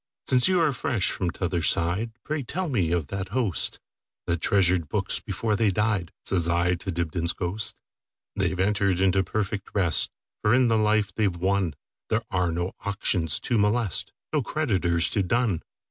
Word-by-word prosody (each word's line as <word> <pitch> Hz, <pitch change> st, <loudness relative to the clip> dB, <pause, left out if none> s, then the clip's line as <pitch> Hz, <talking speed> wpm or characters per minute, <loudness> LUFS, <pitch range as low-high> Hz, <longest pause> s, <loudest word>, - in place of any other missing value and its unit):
"Since 125 Hz, -1 st, +5 dB
you 185 Hz, -1 st, +2 dB
are 160 Hz, -4 st, +2 dB
fresh 120 Hz, -5 st, 0 dB
from 90 Hz, -, -2 dB
t'other 90 Hz, 0 st, -2 dB
side, 90 Hz, +8 st, +2 dB
Pray 155 Hz, 0 st, -3 dB
tell 175 Hz, +8 st, -4 dB
me 95 Hz, -, 0 dB
of 85 Hz, -3 st, 0 dB
that 95 Hz, -1 st, -4 dB
hostThat 90 Hz, -, -2 dB
treasured 90 Hz, -5 st, +2 dB
books -, -, +1 dB
before 110 Hz, -2 st, -2 dB
they 110 Hz, 0 st, +2 dB
died,"Says 95 Hz, -4 st, 0 dB
I 90 Hz, +1 st, +1 dB
to 90 Hz, +3 st, -6 dB
Dibdin's 85 Hz, 0 st, -1 dB
ghost."They 95 Hz, +4 st, -3 dB
've 95 Hz, -, -6 dB
entered 100 Hz, -2 st, +1 dB
into 95 Hz, 0 st, +2 dB
perfect 100 Hz, +1 st, -3 dB
rest; 90 Hz, -6 st, +3 dB, 0.3 s
For 105 Hz, +3 st, +3 dB
in 125 Hz, -1 st, +3 dB
the 115 Hz, -, +2 dB
life 105 Hz, -2 st, +1 dB
they 105 Hz, +1 st, +1 dB
've 90 Hz, -3 st, -4 dB
wonThere 95 Hz, +3 st, -2 dB
are 90 Hz, -3 st, 0 dB
no 85 Hz, +3 st, -3 dB
auctions 95 Hz, -5 st, +1 dB
to 120 Hz, -3 st, 0 dB
molest, 105 Hz, -1 st, +2 dB, 0.2 s
No 150 Hz, -, +2 dB
creditors 95 Hz, -, +1 dB
to 100 Hz, -, 0 dB
dun. 105 Hz, -2 st, 0 dB
95 Hz, 160 wpm, -25 LUFS, 85-110 Hz, 0.3 s, Since